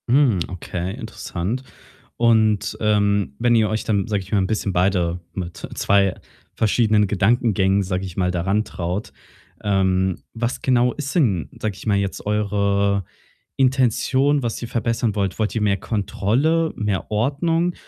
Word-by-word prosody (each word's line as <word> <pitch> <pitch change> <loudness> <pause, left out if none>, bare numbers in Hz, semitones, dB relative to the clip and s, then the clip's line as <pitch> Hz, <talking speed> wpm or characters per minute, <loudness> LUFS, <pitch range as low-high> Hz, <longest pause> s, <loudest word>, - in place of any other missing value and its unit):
Hm, 125 -6 +4
okay, 90 0 -4
interessant. 110 -1 -4 0.5
Und, 110 -3 +2
ähm, 100 -7 +1
wenn 120 0 +3
ihr 110 -2 +3
euch 110 0 -1
dann, 105 -1 0
sage 105 -3 -1
ich 95 - -16
mal, 105 - +3
'n 95 - +1
bisschen 105 -2 -1
beide 90 -1 +1
mit 85 -2 -5 0.2
2 100 -2 +2 0.4
verschiedenen 110 -1 +3
Gedankengängen, 100 -1 +2
sage 90 0 -2
ich 90 -2 -9
mal, 90 -1 +1
da 90 -1 -1
rantraut, 95 0 -2 0.5
ähm, 95 -2 +1
was 120 +2 -2
genau 125 -1 +2
ist 140 -2 -5
denn, 105 - +1
sage 105 -3 -2
ich 95 - -11
mal, 100 -2 +3
jetzt 100 -1 -3
eure 100 -2 +1 0.5
Intention, 130 +2 +2
was 115 -2 -3
ihr 120 - -4
verbessern 115 -1 -1
wollt? 100 -2 -1
Wollt 110 -1 -1
ihr 115 - 0
mehr 100 -2 +2
Kontrolle, 115 - 0
mehr 105 -3 -2
Ordnung 165 +10 +1
105 Hz, 150 wpm, -21 LUFS, 95-120 Hz, 0.5 s, Hm